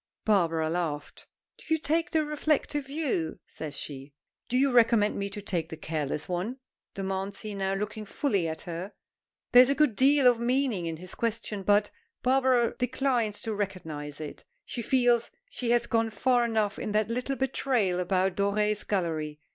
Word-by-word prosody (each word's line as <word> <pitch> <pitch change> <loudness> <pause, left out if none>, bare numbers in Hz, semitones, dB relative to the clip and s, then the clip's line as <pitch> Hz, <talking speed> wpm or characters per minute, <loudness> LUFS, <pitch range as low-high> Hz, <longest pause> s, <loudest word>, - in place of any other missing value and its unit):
Barbara 165 -6 +2
laughed. 160 -3 -3 0.3
"Do - - -13
you 320 - +5
take 320 +3 0
the 315 -2 +1
reflective 295 -1 0
view?" 275 - -2
says 150 -2 -7
she. 140 0 -7 0.4
"Do 250 - +1
you 275 +1 +3
recommend 230 -3 +4
me 200 0 -2
to 200 +1 -8
take 170 -5 -2
the 160 - -7
careless 155 -2 -3
one?" 185 +8 -2 0.4
demands 195 0 -3
he, 215 -1 -5
now 195 -1 -1
looking 210 +2 -4
fully 200 - 0
at 160 0 -4
her. 175 +4 -6 0.6
There 245 - +10
is 255 - +5
a 280 - +2
good 300 -8 +3
deal 275 +2 +4
of 245 -2 +6
meaning 240 -7 0
in 165 -1 -4
his 180 +2 -8
question, 225 -3 -2
but 205 +1 +3 0.3
Barbara 255 -2 +3
declines 250 -4 0
to 225 - -2
recognize 160 -8 -4
it. 155 -2 -7 0.2
She 240 - -4
feels 245 -1 +3 0.2
she 245 - -3
has 240 0 +3
gone 225 -2 +1
far 240 +3 +2
enough 215 -3 0
in 210 - -3
that 215 0 +2
little 250 +3 -1
betrayal 250 -8 0
about 185 +1 +1
Doré's 210 +1 +1
Gallery. 160 -6 -2
210 Hz, 170 wpm, -28 LUFS, 180-250 Hz, 0.6 s, There